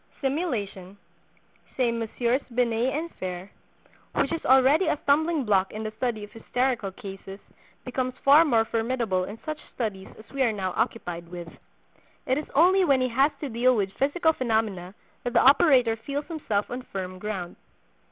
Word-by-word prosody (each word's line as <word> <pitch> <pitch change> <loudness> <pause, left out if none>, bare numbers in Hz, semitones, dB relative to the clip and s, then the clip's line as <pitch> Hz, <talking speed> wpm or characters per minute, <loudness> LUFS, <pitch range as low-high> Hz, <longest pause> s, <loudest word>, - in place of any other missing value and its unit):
"Simulation," 220 - -3 0.8
say 250 -3 +2
Messieurs 235 +3 -1
Binet 240 +1 +1
and 325 +4 -4
Fere, 185 +1 -5 0.6
"which - - +1
is 330 - -3
already 265 +7 +5
a - - +1
stumbling 310 +1 +2
block 195 -3 +2
in 215 +1 -5
the 215 - -4
study 220 -1 -3
of 205 - -10
hysterical 240 -1 -1
cases, 195 -1 -9 0.5
becomes 255 0 -2
far 285 +4 +8
more 230 -8 +3
formidable 225 -5 -1
in 205 +4 -8
such 310 -1 -4 0.2
studies 205 -6 -3
as 220 - -14
we 275 - -3
are 245 -3 +3
now 190 -3 -3
occupied 180 -7 -2
with. 175 -1 -7 0.8
It 260 +3 +1
is 300 - -8
only 370 +6 +5
when 275 -6 +3
he 255 0 +1
has 270 +5 +3
to 290 - -3
deal 245 +2 +3
with 195 -3 -1
physical 320 +4 +1
phenomena 220 - -1 0.3
that 245 - -3
the 235 - +5
operator 265 -5 +5
feels 280 +6 -5
himself 225 - -2
on 245 +1 -4
firm 185 -5 -6
ground." 190 -4 -5
235 Hz, 165 wpm, -26 LUFS, 205-275 Hz, 0.8 s, far